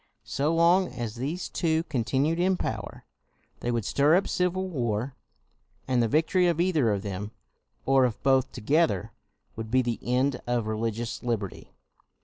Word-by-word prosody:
So 145 +3 0
long 170 +3 +4
as 120 -3 -4
these 145 +10 -3
two 160 -2 0
continued 140 +3 0
in 185 +1 +2
power, 110 -8 -5 0.5
they 120 - -3
would 115 -4 -1
stir 145 +4 +3
up 195 - +2
civil 185 +1 0
war; 125 - -2 0.7
and 125 -2 +2
the 115 - +2
victory 165 - +2
of 170 -2 +1
either 165 -9 +2
of 100 -1 -1
them, 105 +2 -5 0.5
or 135 -1 +4
of 120 -3 -3
both 135 -1 +3
together, 135 - +1 0.4
would 110 -1 -6
be 130 +2 +3
the 120 -2 -2
end 125 +2 0
of 120 -2 0
religious 115 +1 -3
liberty. 110 - -4
130 Hz, 155 wpm, -27 LUFS, 115-165 Hz, 0.7 s, long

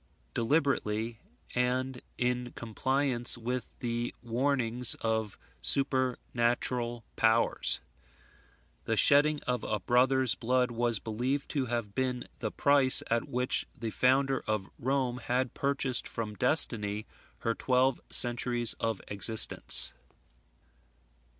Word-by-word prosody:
deliberately, 115 -5 -1 0.3
and 125 +1 -2 0.2
in 125 0 -1
compliance 125 +2 0
with 125 +2 -5
the 120 0 -3
warnings 120 -1 +2
of 110 -2 -2 0.2
supernatural 125 -3 0
powers. 115 +1 +2 1.0
The - - -1
shedding 145 +1 +4
of 125 -1 -3
a 105 - -2
brother's 125 +5 +2
blood 125 +1 0
was 120 -1 -1
believed 125 +7 -3
to 135 -3 -2
have 115 -4 -4
been 125 0 -2 0.2
the 110 - -3
price 140 +1 +4
at 115 0 -1
which 125 +1 +1
the 115 -2 -4
founder 135 +3 +1
of 105 -3 -2
Rome 130 -1 -1
had 125 +1 -2
purchased 140 -3 0
from 110 -3 -5
destiny 110 -4 +1 0.4
her 115 - -1
twelve 130 +2 0
centuries 120 -1 +3
of 115 -4 -3
existence. 105 - +3
125 Hz, 105 wpm, -29 LUFS, 115-130 Hz, 1.0 s, shedding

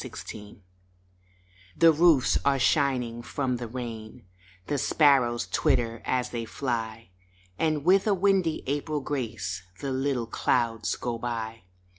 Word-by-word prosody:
APRIL 105 -1 -9 1.2
THE 165 -1 +7
roofs 155 -5 +4
are 140 -1 +3
shining 130 -3 +1
from 125 +1 -2
the 120 -1 -5
rain, 115 -4 -7 0.4
The 145 -1 -1
sparrows 130 -7 +3
twitter 115 -1 +1
as 125 -1 -1
they 120 -1 -3
fly, 115 -4 -4 0.5
And 155 -2 0
with 190 +3 +4
a 205 - +3
windy 190 -4 +1
April 145 +2 -2
grace 110 - -4 0.2
The 140 -2 -3
little 130 -2 -1
clouds 115 0 0
go 120 -2 -4
by. 115 -4 -5
125 Hz, 125 wpm, -27 LUFS, 115-145 Hz, 1.2 s, THE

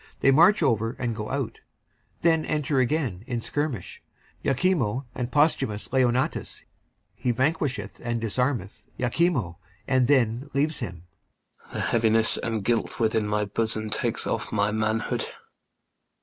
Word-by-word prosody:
They 135 - +5
march 170 +9 +5
over 115 0 +1
and 120 -2 -2
go 105 -1 -5
out. 135 -3 -3
Alarums. - - -42
Then 160 -2 +3
enter 150 -2 0
again, 130 - 0
in 120 -3 -2
skirmish, 140 - -4 0.4
IACHIMO 135 - +1
and 125 0 -4
POSTHUMUS. 130 -3 0 0.5
He 125 - -3
vanquisheth 135 +2 -1
and 120 -1 -1
disarmeth 115 -2 -2
IACHIMO, 125 - 0 0.3
and 130 -2 +3
then 125 0 +2
leaves 150 +3 +1
him 90 -8 -6 0.7
IACHIMO. - - -17
The - - -4
heaviness 115 -1 +5
and 110 -3 -3
guilt 115 -2 0
within 110 -2 +1
my 105 0 0
bosom 110 +1 +1
Takes - - 0
off - - -2
my 105 0 +1
manhood. 110 +1 -1
120 Hz, 135 wpm, -25 LUFS, 110-140 Hz, 0.7 s, They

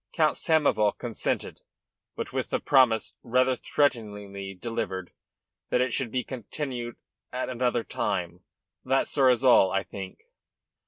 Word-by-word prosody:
Count 155 -3 +3
Samoval 145 -10 +2
consented, 120 -3 -3 0.5
but - - -5
with - - -2
the - - 0
promise, 125 -6 +3
rather 130 +2 +2
threateningly 105 -8 -1
delivered, 95 -4 -4 0.6
that - - +2
it 125 -1 +1
should 130 -4 0
be 125 +2 -1
continued 125 0 -5 0.4
at 130 +1 -3
another 125 -1 0
time. 90 -4 -3 0.4
That, 135 +1 +2
sir, 135 -3 +4
is 125 0 +2
all, 120 -7 +6
I 95 +1 0
think." 95 0 -9
120 Hz, 130 wpm, -27 LUFS, 100-130 Hz, 0.6 s, all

